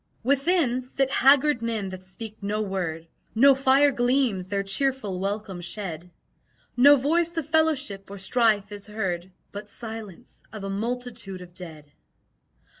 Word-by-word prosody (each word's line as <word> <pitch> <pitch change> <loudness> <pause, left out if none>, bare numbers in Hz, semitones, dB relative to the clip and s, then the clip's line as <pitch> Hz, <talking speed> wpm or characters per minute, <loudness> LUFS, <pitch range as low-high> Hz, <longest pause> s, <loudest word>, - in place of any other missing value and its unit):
Within 275 0 +2
sit 265 +1 -2
haggard 275 -1 +4
men 225 -4 -2
that 185 0 -9
speak 215 +4 -9
no 205 +1 -2
word, 175 -5 -4 0.3
No 275 +5 +7
fire 270 +2 +4
gleams 245 -7 +1
their 200 -1 -1
cheerful 210 -2 0
welcome 195 -2 -3
shed; 175 -2 -5 0.7
No 280 +4 +8
voice 330 +5 0
of 325 - -1
fellowship 310 -12 0
or 200 - -8
strife 210 0 +1
is 205 0 -8
heard 190 -4 -3 0.2
But 205 +1 -8
silence 220 -6 -9
of 215 -2 -8
a 195 - -4
multitude 225 -3 -4
of 175 -1 -15
dead. 160 -5 -11
215 Hz, 140 wpm, -25 LUFS, 195-265 Hz, 0.7 s, No